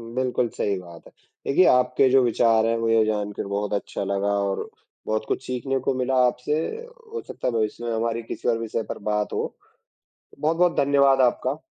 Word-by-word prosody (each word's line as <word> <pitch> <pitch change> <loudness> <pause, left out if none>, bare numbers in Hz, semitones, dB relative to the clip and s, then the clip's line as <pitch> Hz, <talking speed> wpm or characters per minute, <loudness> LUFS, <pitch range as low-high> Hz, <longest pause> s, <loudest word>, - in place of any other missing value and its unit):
बिल्कुल 125 -1 0
सही 100 -1 0
बात 85 -2 -13
है। - - -17 0.4
देखिए, 180 +7 +4
आपके 125 +1 +4
जो 135 0 +5
विचार 115 -2 +3
हैं, 115 0 +1
मुझे 115 -1 +3
जानकर 105 -2 -2
बहुत 100 +1 -2
अच्छा 100 0 -3
लगा 100 +1 -1 0.2
और 95 - -3 0.4
बहुत 110 0 -1
कुछ - - -2
सीखने 130 +2 -2
को 135 - 0
मिला 130 +1 0
आपसे। 150 +5 -1 0.5
हो 455 - -3
सकता - - -4
है, 125 - 0
भविष्य 110 +1 -1
में 120 - -2
हमारी 115 +1 -1
किसी 115 - -3
और 115 - +2
विषय 115 0 -3
पर - - -4
बात 105 0 -1
हो। - - -3 0.8
बहुत-बहुत 170 +3 +2
धन्यवाद 140 -1 +4
आपका। 130 +3 -3
115 Hz, 185 wpm, -24 LUFS, 105-135 Hz, 0.8 s, जो